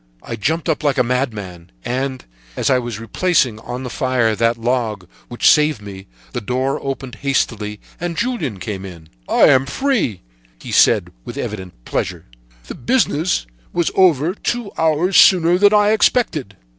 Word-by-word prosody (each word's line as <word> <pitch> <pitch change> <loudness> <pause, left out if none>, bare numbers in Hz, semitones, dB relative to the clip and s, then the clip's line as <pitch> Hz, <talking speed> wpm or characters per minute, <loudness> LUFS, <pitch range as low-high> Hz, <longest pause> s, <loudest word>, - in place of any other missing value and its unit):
"I 115 - -5
jumped 160 +10 -1
up 160 -2 -1
like 145 -1 +1
a 125 - +4
madman, 105 -9 -3
and, 130 +1 -3 0.3
as - - 0
I 130 - +4
was 120 -3 -5
replacing 125 -2 +1
on 125 +3 -6
the 125 - -5
fire 125 -5 +1
that 115 +1 +1
log 115 -5 -2 0.2
which 120 - -10
had - - +8
saved 150 -4 +1
me, 100 -2 -10 0.3
the 120 - -3
door 130 +5 -1
opened 135 -1 -5
hastily, 110 -6 -1 0.2
and 175 -1 -4
Julien 175 - -2
came 95 0 -5
in. 85 -5 -11 0.2
"'I - - +3
am 130 +1 +4
free,' 215 - -1 0.4
he - - -9
said, - - +4
with - - -8
evident 95 - -6
pleasure. - - -3 0.4
'The - - -7
business 180 - 0 0.3
was 170 -1 0
over 170 -3 +3
two 235 +1 -3
hours 160 +4 +2
sooner 180 -1 +6
than 205 0 +6
I 210 0 +4
expected!' 205 - +1
130 Hz, 165 wpm, -19 LUFS, 110-165 Hz, 0.4 s, had